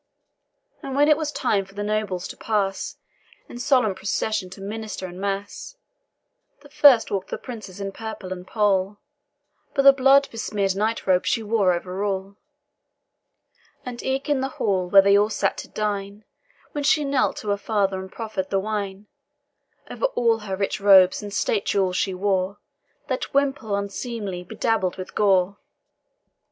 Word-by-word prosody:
And 270 Hz, -1 st, -5 dB
when 290 Hz, +1 st, +4 dB
it 305 Hz, -, +6 dB
was 305 Hz, -1 st, -3 dB
time 215 Hz, -9 st, 0 dB
for 195 Hz, +1 st, -18 dB
the 205 Hz, -, -3 dB
nobles 205 Hz, -4 st, -2 dB
to -, -, -8 dB
pass, 200 Hz, -3 st, -2 dB, 0.5 s
In 240 Hz, -, -9 dB
solemn 250 Hz, -5 st, +3 dB
procession 195 Hz, +1 st, -2 dB
to 185 Hz, -, -11 dB
minster 210 Hz, 0 st, -5 dB
and 180 Hz, +1 st, -8 dB
mass, 200 Hz, -, -4 dB, 0.9 s
The 285 Hz, -, -15 dB
first 285 Hz, -6 st, +6 dB
walk'd 195 Hz, -2 st, -2 dB
the -, -, -3 dB
Princess 215 Hz, -7 st, -9 dB
in 195 Hz, 0 st, -4 dB
purple 215 Hz, -3 st, -6 dB
and 180 Hz, 0 st, -10 dB
pall, 205 Hz, -2 st, +1 dB, 0.8 s
But 275 Hz, -, +3 dB
the 275 Hz, 0 st, +9 dB
blood 275 Hz, +1 st, +5 dB
besmear'd 205 Hz, -4 st, -1 dB
night 220 Hz, +3 st, -1 dB
robe 185 Hz, -1 st, +2 dB
she 230 Hz, -, +1 dB
wore 210 Hz, -3 st, +2 dB
over 180 Hz, +2 st, -3 dB
all; 195 Hz, 0 st, -3 dB, 1.5 s
And 245 Hz, -1 st, -6 dB
eke, 265 Hz, +2 st, -2 dB
in 290 Hz, -3 st, +1 dB
the 265 Hz, -, -1 dB
hall, 185 Hz, -3 st, 0 dB
where 195 Hz, +1 st, +7 dB
they 200 Hz, 0 st, +5 dB
all 205 Hz, +1 st, +4 dB
sat -, -, -1 dB
at -, -, -23 dB
dine, 205 Hz, 0 st, -3 dB, 0.5 s
When 290 Hz, -, -3 dB
she 295 Hz, +1 st, +3 dB
knelt 275 Hz, -2 st, +1 dB
to 210 Hz, -, -5 dB
her 200 Hz, -, +3 dB
father 200 Hz, -2 st, 0 dB
and 190 Hz, 0 st, -8 dB
proffer'd 215 Hz, -5 st, -4 dB
the 195 Hz, -, +1 dB
wine, 200 Hz, -1 st, -4 dB, 0.9 s
Over -, -, 0 dB
all 230 Hz, -2 st, +2 dB
her 200 Hz, -3 st, -4 dB
rich 195 Hz, +2 st, -2 dB
robes 190 Hz, -2 st, +6 dB
and 205 Hz, -1 st, -7 dB
state 205 Hz, 0 st, 0 dB
jewels 190 Hz, -2 st, +1 dB
she 190 Hz, 0 st, 0 dB
wore 190 Hz, 0 st, 0 dB, 0.5 s
That 260 Hz, +1 st, -3 dB
wimple 270 Hz, -7 st, +1 dB
unseemly 200 Hz, -2 st, -4 dB
bedabbled 190 Hz, -1 st, -1 dB
with 185 Hz, -, -7 dB
gore. 195 Hz, -1 st, +2 dB
205 Hz, 165 wpm, -23 LUFS, 195-230 Hz, 1.5 s, the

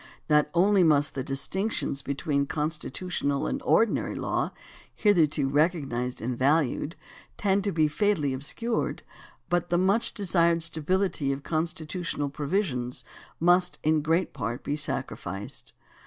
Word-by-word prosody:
Not 150 Hz, -1 st, +4 dB
only 190 Hz, +2 st, +5 dB
must 150 Hz, -2 st, +3 dB
the 135 Hz, -, -3 dB
distinctions 140 Hz, +3 st, -1 dB
between 140 Hz, +1 st, -1 dB
constitutional 155 Hz, -1 st, -2 dB
and 275 Hz, -, -2 dB
ordinary 230 Hz, -4 st, +2 dB
law -, -, -1 dB, 0.5 s
hitherto 160 Hz, -9 st, +3 dB
recognized 135 Hz, -6 st, 0 dB
and 125 Hz, +1 st, -1 dB
valued 145 Hz, +3 st, +1 dB, 0.4 s
tend 200 Hz, -1 st, +1 dB
to 200 Hz, -, +1 dB
be 155 Hz, -3 st, +3 dB
fatally 155 Hz, -4 st, +1 dB
obscured, 225 Hz, -, -2 dB, 0.4 s
but 175 Hz, 0 st, 0 dB
the 175 Hz, -, +2 dB
much 195 Hz, +5 st, +2 dB
to 205 Hz, -, -4 dB
be -, -, -1 dB
desired 170 Hz, -2 st, +3 dB
stability 165 Hz, -2 st, 0 dB
of 135 Hz, +1 st, -4 dB
constitutional 160 Hz, -1 st, -2 dB
provisions 140 Hz, -4 st, -2 dB, 0.4 s
must 180 Hz, +1 st, +3 dB
in 155 Hz, 0 st, +3 dB
great 165 Hz, +4 st, +1 dB
part 115 Hz, +4 st, -4 dB
be 145 Hz, -, -1 dB
sacrificed. 105 Hz, -8 st, -4 dB
155 Hz, 130 wpm, -27 LUFS, 140-180 Hz, 0.5 s, only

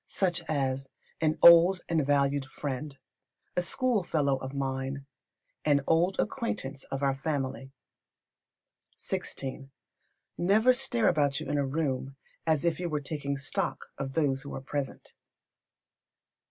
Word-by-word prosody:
Such 175 Hz, -3 st, 0 dB
as 135 Hz, -2 st, -1 dB, 0.3 s
"an 155 Hz, 0 st, +2 dB
old 170 Hz, +2 st, +8 dB
and 160 Hz, -3 st, +1 dB
valued 140 Hz, -1 st, +1 dB
friend," 140 Hz, +1 st, -5 dB, 0.6 s
a 180 Hz, -, +2 dB
"schoolfellow 175 Hz, -, +1 dB
of 130 Hz, 0 st, -6 dB
mine," 135 Hz, 0 st, -3 dB, 0.6 s
"an 145 Hz, -2 st, +3 dB
old 175 Hz, +4 st, +2 dB
acquaintance 175 Hz, -, -2 dB
of 135 Hz, +1 st, -4 dB
our 135 Hz, -1 st, +3 dB
family." 135 Hz, -1 st, -3 dB, 1.3 s
xvi. 135 Hz, 0 st, -4 dB, 0.7 s
Never 215 Hz, +8 st, +4 dB
stare 250 Hz, -3 st, +2 dB
about 145 Hz, -4 st, +2 dB
you -, -, -6 dB
in 145 Hz, 0 st, 0 dB
a 140 Hz, -, 0 dB
room 135 Hz, -2 st, -2 dB, 0.3 s
as 160 Hz, 0 st, +2 dB
if 170 Hz, -1 st, +1 dB
you 175 Hz, -1 st, -2 dB
were 150 Hz, -2 st, -1 dB
taking 140 Hz, -1 st, -3 dB
stock 135 Hz, -, -3 dB
of 135 Hz, -1 st, -5 dB
those 135 Hz, -4 st, +1 dB
who 140 Hz, -, -6 dB
are -, -, -5 dB
present. 140 Hz, 0 st, -5 dB
145 Hz, 130 wpm, -29 LUFS, 135-170 Hz, 1.3 s, old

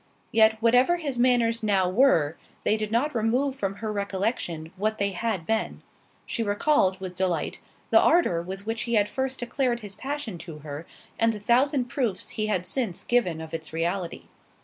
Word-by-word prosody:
Yet, 220 Hz, 0 st, +4 dB
whatever 250 Hz, +8 st, +5 dB
his 280 Hz, -7 st, -3 dB
manners 240 Hz, -2 st, +3 dB
now 195 Hz, -4 st, +2 dB
were, 180 Hz, -, +3 dB, 0.3 s
they 215 Hz, -, +3 dB
did 215 Hz, -1 st, -3 dB
not 260 Hz, +7 st, +1 dB
remove 250 Hz, +4 st, +1 dB
from 195 Hz, -6 st, -2 dB
her 215 Hz, 0 st, -4 dB
recollection 195 Hz, -5 st, -2 dB
what 215 Hz, +3 st, -1 dB
they 200 Hz, 0 st, 0 dB
had 195 Hz, -2 st, -2 dB
been—she 225 Hz, +2 st, -4 dB
recalled, 205 Hz, -2 st, +2 dB
with 185 Hz, -1 st, -6 dB
delight, 180 Hz, -2 st, -1 dB, 0.3 s
the -, -, +7 dB
ardour 325 Hz, -, +3 dB
with 190 Hz, +3 st, -7 dB
which 225 Hz, 0 st, -2 dB
he 235 Hz, -, +2 dB
had 205 Hz, -1 st, +4 dB
first 265 Hz, +2 st, -3 dB
declared 240 Hz, -1 st, -1 dB
his 205 Hz, -2 st, -8 dB
passion 270 Hz, -, -5 dB
to 165 Hz, -3 st, -8 dB
her, 150 Hz, +2 st, -7 dB, 0.3 s
and 230 Hz, 0 st, +3 dB
the 210 Hz, -, -6 dB
thousand 255 Hz, +5 st, +2 dB
proofs 240 Hz, -6 st, -2 dB
he 215 Hz, -1 st, -2 dB
had 185 Hz, -4 st, 0 dB
since 220 Hz, -4 st, 0 dB
given 205 Hz, -10 st, +1 dB
of 160 Hz, 0 st, -8 dB
its 160 Hz, -1 st, -5 dB
reality. 170 Hz, +2 st, -2 dB
215 Hz, 175 wpm, -26 LUFS, 185-245 Hz, 0.3 s, the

